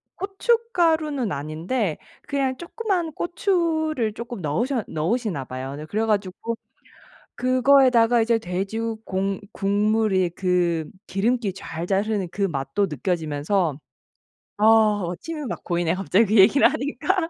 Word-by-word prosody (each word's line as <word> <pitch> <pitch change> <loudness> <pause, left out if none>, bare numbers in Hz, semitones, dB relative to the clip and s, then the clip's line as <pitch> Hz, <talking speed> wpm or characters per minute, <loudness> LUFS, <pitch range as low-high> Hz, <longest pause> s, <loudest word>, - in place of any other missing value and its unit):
고춧가루는 345 - +1
아닌데 160 - -2 0.3
그냥 270 -2 0
쪼끄만 360 -2 -2
고추를 320 - 0
쪼끔 235 0 -7
넣으셔 230 - -1
넣으시나 175 - -1
봐요. 130 +2 -6
네. 150 +2 -7
그래 215 +7 -1
가지고 210 +1 -1 0.8
그거에다가 255 -2 +4
이제 230 0 +2
돼지 195 +2 -3 0.3
공 195 +1 -2
국물의 205 -2 +1
그 175 -3 0 0.2
기름기 220 +1 0
좔좔 180 0 -3
흐르는 210 -4 -1
그 200 - -3
맛도 170 +3 0
느껴지면서 160 0 -1 0.8
아 215 -1 +4 0.2
침이 315 -3 -5
막 240 - -5
고이네, 170 -2 0
갑자기 195 +3 +2
그 215 +2 0
얘기를 220 +9 +7
하니까. 325 +6 -1
215 Hz, 280 characters per minute, -23 LUFS, 180-265 Hz, 0.8 s, 얘기를